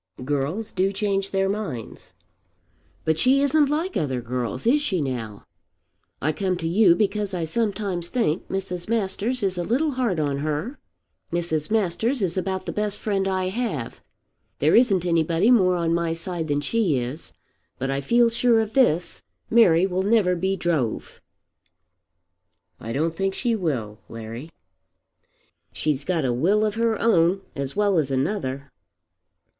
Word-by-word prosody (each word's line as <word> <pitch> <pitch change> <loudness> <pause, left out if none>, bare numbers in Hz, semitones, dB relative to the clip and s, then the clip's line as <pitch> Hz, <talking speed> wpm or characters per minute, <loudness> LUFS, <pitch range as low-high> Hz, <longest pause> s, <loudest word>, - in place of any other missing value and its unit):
"Girls 145 +10 -2
do 190 +1 +1
change 195 -1 -1
their 195 0 +1
minds." 195 - -5 0.9
"But 160 0 +1
she 270 +2 +4
isn't 290 0 +3
like 325 +6 -1
other 135 -5 -1
girls. 125 +1 -4
Is 280 +6 +4
she 195 -11 -1
now? 120 -7 -4 0.8
I 155 - 0
come 185 +3 -1
to 165 -2 -3
you 180 0 +5
because 205 -1 -1
I 170 - -2
sometimes 195 -1 -2
think 205 -9 -1
Mrs. 185 -1 -4
Masters 225 +2 -1
is 190 -2 0
a - - -1
little 275 - +1
hard 245 - -1
on 140 -2 -1
her. 155 - -3 0.5
Mrs. 165 -3 -1
Masters 225 +4 0
is 175 -2 -1
about 190 0 -2
the - - -3
best 210 -1 -1
friend 195 -2 -1
I 185 -1 0
have. 190 - -4 0.6
There 150 +3 +3
isn't 200 -7 +4
anybody 170 +5 +2
more 185 -7 +4
on 170 -1 0
my 170 -1 0
side 165 -1 -4
than 145 -1 0
she 180 - +1
is. 125 +6 -5 0.5
But 135 +1 -2
I 135 0 -1
feel 235 - +3
sure 235 0 +3
of 220 -1 -2
this; 180 - +2 0.3
Mary 185 -7 +5
will 185 -1 -1
never 200 -3 +3
be 190 +3 0
drove." 160 - -2 1.6
"I 115 - -6
don't 160 +6 -1
think 195 +2 -1
she 240 -3 0
will, 125 - -3
Larry." 115 +6 -8 1.2
"She's 145 -2 -1
got 165 -3 -1
a 125 - +1
will 195 - +2
of 210 - -1
her 225 0 0
own 185 -3 +3
as 140 -1 -4
well 200 -4 +2
as 145 -3 0
another." 140 -1 -2
185 Hz, 155 wpm, -24 LUFS, 155-215 Hz, 1.6 s, you